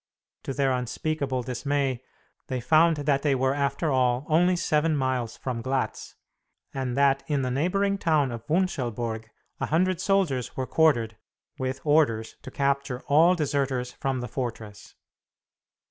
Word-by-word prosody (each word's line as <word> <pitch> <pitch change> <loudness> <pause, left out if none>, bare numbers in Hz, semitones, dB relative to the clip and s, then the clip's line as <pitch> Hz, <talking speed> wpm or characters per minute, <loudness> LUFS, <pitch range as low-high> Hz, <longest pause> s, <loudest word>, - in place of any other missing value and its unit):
To 135 - -3
their 135 -2 +2
unspeakable 130 +1 -2
dismay, 135 0 -1 0.5
they 130 -1 -2
found 160 +6 +4
that 140 -2 +2
they 145 -2 +2
were, 130 +1 +1
after 145 +2 -1
all, 130 0 +1
only 175 +4 +4
seven 155 -2 +1
miles 130 -4 -1
from 125 -3 -4
Glatz, 130 +2 -3 0.6
and 130 -2 -3
that 140 -1 +3
in 145 -3 0
the 125 - -1
neighboring 195 +8 0
town 155 -7 +2
of 115 -1 -6
Wunschelburg 120 - -1 0.3
a - - -1
hundred 185 +2 +1
soldiers 180 - 0
were 130 - -1
quartered, 120 -9 +2 0.4
with 130 0 -3
orders 145 -8 +2
to - - -9
capture 140 -1 -1
all 165 +5 +5
deserters 135 -5 -1
from 135 -1 -3
the 125 - -4
fortress. 115 -6 -6
135 Hz, 145 wpm, -26 LUFS, 125-155 Hz, 0.6 s, all